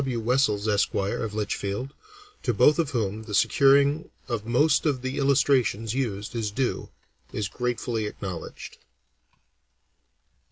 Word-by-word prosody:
W. 130 -3 -2
Wessells, 115 -3 +1
Esq., 105 -1 +1
of 100 +2 -2
Litchfield, 105 +4 -3 0.5
to - - -1
both 150 +1 +5
of 160 -4 +1
whom 110 -5 -2
the 110 -2 -5
securing 140 - +4 0.2
of 115 -4 -3
most 145 +7 +3
of 130 -4 -1
the 130 +2 -3
illustrations 130 -6 +2
used 115 -5 -3
is 110 -3 -1
due, 125 +5 -2 0.4
is 105 - -2
gratefully 120 -1 -2
acknowledged. 95 -5 -7
120 Hz, 125 wpm, -26 LUFS, 105-135 Hz, 0.5 s, both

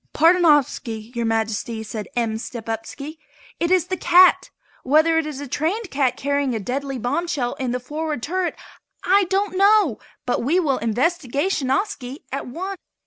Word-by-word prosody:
"Pardonoviski, 295 -9 +3
Your 235 -1 -1
Majesty," 225 0 -1
said 215 -1 -6
M. 225 -2 -1
Stepupski, 235 +7 -6 0.4
"it 340 - 0
is 365 -2 +3
the 370 - -2
cat! 360 +2 +5 0.3
Whether 315 +4 +3
it 315 - -2
is 295 -3 -6
a 285 - -6
trained 355 - -2
cat 265 -3 +1
carrying 280 -2 0
a - - -1
deadly 270 +5 -3
bombshell 275 +1 -1
in 260 -2 -1
the 250 +1 -1
forward 300 0 -4
turret, 365 +2 -1 0.5
I 390 +1 +4
don't 385 +2 -1
know, 395 - +4 0.3
but 245 - 0
we 310 +9 +2
will 280 -7 +1
investigationiski 275 - -1
at 275 +1 -4
once." 375 +9 -5
285 Hz, 150 wpm, -22 LUFS, 245-345 Hz, 0.5 s, cat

